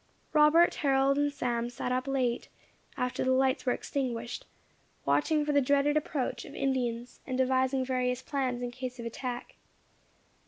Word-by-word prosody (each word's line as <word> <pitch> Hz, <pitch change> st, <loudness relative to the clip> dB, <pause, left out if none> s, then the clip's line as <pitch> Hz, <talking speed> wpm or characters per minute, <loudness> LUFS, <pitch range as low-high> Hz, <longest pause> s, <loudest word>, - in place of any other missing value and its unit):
Robert, 310 Hz, +3 st, +6 dB
Harold 275 Hz, -1 st, +2 dB
and 290 Hz, 0 st, +2 dB
Sam 240 Hz, -3 st, -1 dB
sat 245 Hz, +1 st, -4 dB
up 255 Hz, +1 st, -1 dB
late, 255 Hz, -3 st, 0 dB, 0.5 s
after 250 Hz, 0 st, -1 dB
the 260 Hz, -, +2 dB
lights 260 Hz, 0 st, +2 dB
were -, -, +4 dB
extinguished, 245 Hz, -3 st, -3 dB, 0.6 s
watching 220 Hz, -, +2 dB
for 295 Hz, -, +1 dB
the 285 Hz, -1 st, +4 dB
dreaded 285 Hz, +2 st, +2 dB
approach 265 Hz, -5 st, -1 dB
of 280 Hz, -, -11 dB
Indians, 245 Hz, -3 st, -2 dB
and 260 Hz, -1 st, -2 dB
devising 260 Hz, 0 st, +2 dB
various 250 Hz, -1 st, -1 dB
plans 255 Hz, -3 st, -2 dB
in 245 Hz, -, -3 dB
case 250 Hz, 0 st, -6 dB
of 235 Hz, -, -5 dB
attack. 240 Hz, +1 st, -5 dB
260 Hz, 155 wpm, -30 LUFS, 245-275 Hz, 0.6 s, Robert